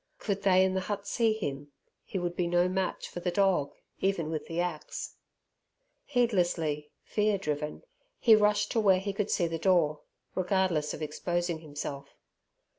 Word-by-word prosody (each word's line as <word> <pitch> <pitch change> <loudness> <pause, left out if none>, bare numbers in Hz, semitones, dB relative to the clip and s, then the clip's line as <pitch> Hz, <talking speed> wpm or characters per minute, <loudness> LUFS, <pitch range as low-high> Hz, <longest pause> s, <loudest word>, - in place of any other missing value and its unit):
Could 200 -2 -2
they 190 -1 +5
in 190 - 0
the 190 - +1
hut 200 +1 -4
see 225 +2 +2
him, 145 -9 -4 0.3
he - - -5
would 175 -1 -2
be 175 -1 0
no 175 +1 +3
match 185 0 -2
for - - -7
the 180 - -1
dog 185 -6 +2 0.2
even 175 -5 0
with 155 - -4
the 165 +1 -3
axe. 175 -3 -3 0.9
Heedlessly, 175 - +1
fear 210 -1 +1
driven, 150 -4 -3 0.3
he 230 - +6
rushed 210 0 +2
to 230 - +2
where 195 -4 +5
he 200 +1 -3
could 205 +1 -1
see 175 - +2
the 165 -1 -2
door, 165 -4 +3 0.3
regardless 185 -5 +1
of - - -6
exposing 175 +2 -2
himself. 145 -2 -7
180 Hz, 165 wpm, -30 LUFS, 160-200 Hz, 0.9 s, he